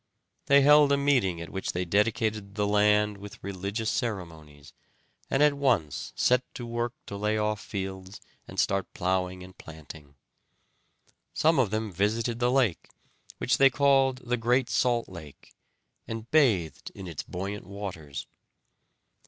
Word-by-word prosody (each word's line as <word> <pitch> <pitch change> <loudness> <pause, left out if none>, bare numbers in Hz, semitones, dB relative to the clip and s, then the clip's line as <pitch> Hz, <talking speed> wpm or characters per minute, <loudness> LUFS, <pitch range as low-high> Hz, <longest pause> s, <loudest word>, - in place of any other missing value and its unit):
They 140 0 +6
held 145 0 +6
a 140 - +4
meeting 125 -12 +2
at 85 - -8
which 95 -2 -3
they 90 +1 -2
dedicated 105 +1 0
the 105 - 0
land 105 0 +3
with 100 0 -10
religious 100 +3 -3
ceremonies, 80 - -5 0.6
and 135 - +3
at 150 -1 +5
once 115 - 0
set 125 0 +3
to 120 - -6
work 120 +1 -3
to 100 - -7
lay 105 +2 0
off 105 0 -1
fields 95 -2 -6 0.3
and - - -6
start 95 -1 0
plowing 90 0 -1
and 95 0 -13
planting. 80 -2 -12 1.2
Some 160 -1 +3
of 120 -6 +3
them 110 0 -2
visited 110 +5 -1
the 120 0 +2
lake, 125 -9 +1 0.5
which 125 - +1
they 135 0 +7
called 135 -1 +3
the 125 +1 0
Great 125 +2 +1
Salt 120 -2 +1
Lake, 80 -6 -12 0.5
and 115 +1 -7
bathed 110 - +2
in 95 - -8
its 85 -5 -5
buoyant 95 +1 -6
waters. 85 -10 -7
105 Hz, 145 wpm, -27 LUFS, 95-120 Hz, 1.2 s, they